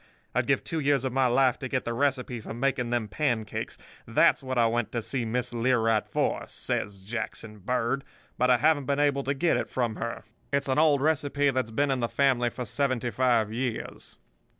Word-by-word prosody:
I'd -, -, 0 dB
give -, -, +2 dB
two 165 Hz, -, -3 dB
years 140 Hz, -3 st, +2 dB
of 130 Hz, -, -2 dB
my 135 Hz, -1 st, +3 dB
life 125 Hz, 0 st, +3 dB
to 130 Hz, -, -4 dB
get 130 Hz, 0 st, -2 dB
the 120 Hz, -, -2 dB
recipe 130 Hz, -2 st, -1 dB
for 110 Hz, -, -7 dB
making 125 Hz, -1 st, 0 dB
them 120 Hz, -3 st, 0 dB
pancakes. 110 Hz, -2 st, -2 dB, 0.3 s
That's -, -, +4 dB
what 130 Hz, -1 st, -4 dB
I 120 Hz, -, +5 dB
went 115 Hz, -1 st, 0 dB
to 120 Hz, -, -1 dB
see 125 Hz, -1 st, -2 dB
Miss 125 Hz, +2 st, -2 dB
Learight 115 Hz, -3 st, +2 dB
for,' -, -, -1 dB
says 100 Hz, -1 st, -3 dB
Jackson 110 Hz, 0 st, -5 dB
Bird, 125 Hz, +5 st, -1 dB, 0.3 s
'but 125 Hz, +1 st, +2 dB
I 125 Hz, -, +6 dB
haven't 145 Hz, 0 st, +2 dB
been 140 Hz, 0 st, +1 dB
able 145 Hz, -1 st, +2 dB
to 140 Hz, +1 st, -2 dB
get 165 Hz, +4 st, +2 dB
it -, -, -3 dB
from 120 Hz, -4 st, -1 dB
her. 115 Hz, -1 st, -4 dB, 0.3 s
It's 140 Hz, 0 st, 0 dB
an 130 Hz, -, +2 dB
old 150 Hz, -3 st, +4 dB
recipe 145 Hz, -2 st, +1 dB
that's 130 Hz, -3 st, -1 dB
been 140 Hz, +5 st, +1 dB
in 130 Hz, -, 0 dB
the 120 Hz, -, 0 dB
family 130 Hz, -4 st, +2 dB
for 125 Hz, +1 st, -6 dB
seventy 130 Hz, 0 st, -1 dB
five 115 Hz, -2 st, +2 dB
years. 120 Hz, -1 st, -4 dB
125 Hz, 205 wpm, -27 LUFS, 115-140 Hz, 0.3 s, I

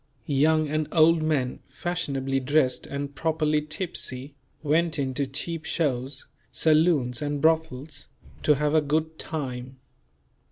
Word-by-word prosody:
Young 155 Hz, +2 st, +3 dB
and 155 Hz, +1 st, -1 dB
old 165 Hz, 0 st, +5 dB
men, 145 Hz, -5 st, 0 dB
fashionably 135 Hz, -6 st, -2 dB
dressed 135 Hz, -1 st, +1 dB
and 140 Hz, 0 st, -4 dB
properly 155 Hz, -1 st, +1 dB
tipsy, 150 Hz, -4 st, -4 dB, 0.3 s
went 160 Hz, +2 st, +2 dB
in 135 Hz, -2 st, -1 dB
to 140 Hz, +1 st, -1 dB
cheap 160 Hz, +4 st, -2 dB
shows, 135 Hz, -4 st, -2 dB, 0.3 s
saloons 155 Hz, -6 st, +3 dB
and 145 Hz, -1 st, -2 dB
brothels, 155 Hz, -2 st, 0 dB, 0.3 s
to 150 Hz, -, +4 dB
have 150 Hz, +1 st, 0 dB
a 155 Hz, -, +5 dB
"good 155 Hz, +2 st, -1 dB
time." 130 Hz, -4 st, -5 dB
150 Hz, 125 wpm, -26 LUFS, 135-160 Hz, 0.3 s, old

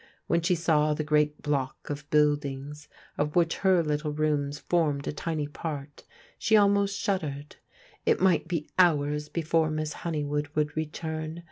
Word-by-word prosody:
When 170 Hz, -, +1 dB
she 180 Hz, +2 st, +2 dB
saw 155 Hz, -3 st, +2 dB
the 155 Hz, -, -2 dB
great 150 Hz, 0 st, +1 dB
block 140 Hz, -1 st, -2 dB
of 145 Hz, 0 st, -6 dB
buildings, 145 Hz, -1 st, 0 dB, 0.3 s
of 150 Hz, +1 st, 0 dB
which 170 Hz, -2 st, +2 dB
her 185 Hz, -3 st, +3 dB
little 150 Hz, 0 st, -1 dB
rooms 150 Hz, -1 st, 0 dB
formed 150 Hz, -4 st, 0 dB
a -, -, -2 dB
tiny 155 Hz, -1 st, -2 dB
part, 145 Hz, -1 st, -6 dB, 0.3 s
she 220 Hz, 0 st, +4 dB
almost 200 Hz, -1 st, +3 dB
shuddered. 150 Hz, -7 st, -3 dB, 0.5 s
It -, -, +2 dB
might 180 Hz, -3 st, +3 dB
be 165 Hz, -3 st, -2 dB
hours 150 Hz, -4 st, +3 dB
before 160 Hz, -1 st, +1 dB
Miss 155 Hz, 0 st, -2 dB
Hone3rwood 150 Hz, -2 st, -3 dB
would 150 Hz, -1 st, 0 dB
return. 160 Hz, +1 st, -4 dB
150 Hz, 150 wpm, -28 LUFS, 145-165 Hz, 0.5 s, she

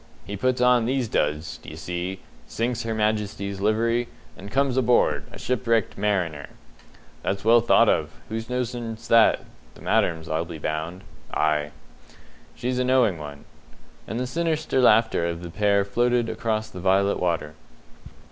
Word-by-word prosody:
He 100 Hz, -, -5 dB
puts 130 Hz, +4 st, 0 dB
on 125 Hz, -2 st, +4 dB
these 130 Hz, 0 st, 0 dB
duds, 75 Hz, -2 st, -1 dB
d'ye 75 Hz, -, -10 dB
see, 90 Hz, +4 st, -4 dB, 0.3 s
sinks 120 Hz, +1 st, -2 dB
Her 115 Hz, -1 st, -3 dB
Majesty's 105 Hz, -2 st, -1 dB
livery, 115 Hz, +3 st, +1 dB, 0.3 s
and 100 Hz, +2 st, -10 dB
comes 135 Hz, +1 st, +1 dB
aboard, 125 Hz, -2 st, +2 dB
a -, -, -10 dB
'shipwrecked 115 Hz, -3 st, 0 dB
mariner'." 90 Hz, -8 st, -1 dB, 0.7 s
"That's 100 Hz, +1 st, -3 dB
well 115 Hz, +1 st, +6 dB
thought 120 Hz, -, +5 dB
of. -, -, +2 dB, 0.2 s
Whose 110 Hz, +1 st, -5 dB
notion's 120 Hz, -2 st, -4 dB
that? 115 Hz, -1 st, +5 dB, 0.3 s
The -, -, -15 dB
Madam's, 80 Hz, -2 st, +1 dB
I'll 80 Hz, +1 st, -1 dB
be 85 Hz, -1 st, -8 dB
bound." 80 Hz, +5 st, -4 dB, 0.3 s
"Ay." 75 Hz, -1 st, +1 dB, 0.9 s
"She's 125 Hz, +1 st, -2 dB
a -, -, +2 dB
knowing 125 Hz, -9 st, +3 dB
one." 75 Hz, -1 st, -9 dB, 0.6 s
And 115 Hz, -, -3 dB
the 125 Hz, -, -1 dB
sinister 155 Hz, -1 st, 0 dB
laughter 110 Hz, -7 st, +4 dB
of 85 Hz, 0 st, -4 dB
the 85 Hz, -, -7 dB
pair 100 Hz, 0 st, +2 dB
floated 120 Hz, +2 st, +1 dB
across 110 Hz, -2 st, -2 dB
the 90 Hz, -, -8 dB
violet 95 Hz, +2 st, +2 dB
water. 85 Hz, -4 st, -1 dB
110 Hz, 150 wpm, -24 LUFS, 90-120 Hz, 0.9 s, well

